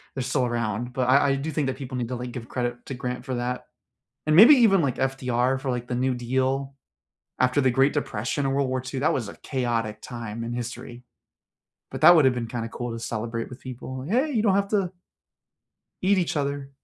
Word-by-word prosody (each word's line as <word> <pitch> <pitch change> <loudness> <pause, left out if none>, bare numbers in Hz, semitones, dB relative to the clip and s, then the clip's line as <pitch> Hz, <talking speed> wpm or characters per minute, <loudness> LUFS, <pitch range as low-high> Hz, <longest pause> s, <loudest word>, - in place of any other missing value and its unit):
they're 135 - -2
still 130 0 0
around, 120 0 -2
but 125 -1 0
I 140 +1 +5
I - - +2
do 145 +4 -3
think 145 -2 -1
that 130 - -1
people 130 -1 -6
need 120 -2 -2
to, 130 - -3
like, 125 0 -5
give 115 -2 -7
credit 120 -1 -3
to - - -5
Grant 125 0 -5
for 130 -2 -3
that, 125 +1 -3 0.6
and 155 - +3
maybe 225 - +10
even, 215 -6 +5
like, 135 -5 -1
FDR 130 -1 0
for, 135 0 -3
like, 120 -1 -3
the 125 - -2
New 130 +1 +1
Deal, 130 +3 -1 0.7
after 125 +2 +3
the 130 -2 +3
Great 135 +3 +3
Depression 140 -1 -2
and 135 0 0
World 140 -2 +1
War 130 -1 -1
II, 130 +1 -5
that 150 - +3
was 120 -6 -2
a 100 - -9
chaotic 115 -5 -2
time 115 -2 -6
in 120 - -4
history, 120 0 -6 0.9
but - - -6
that - - +9
would 155 -4 +5
have 130 - +4
been 120 -2 -3
kinda 115 -1 -4
cool 120 +1 -5
to 115 - -5
celebrate 115 0 -4
with 125 +1 -11
people, 130 0 -7
like, 135 - -7
"Hey, 260 +8 +2
you 225 - +2
don't 205 -3 +3
have 200 0 +1
to" 195 -4 0 1.1
"Eat 195 +2 +3
each 175 -2 -1
other." 140 -1 -2
130 Hz, 230 wpm, -25 LUFS, 120-140 Hz, 1.1 s, maybe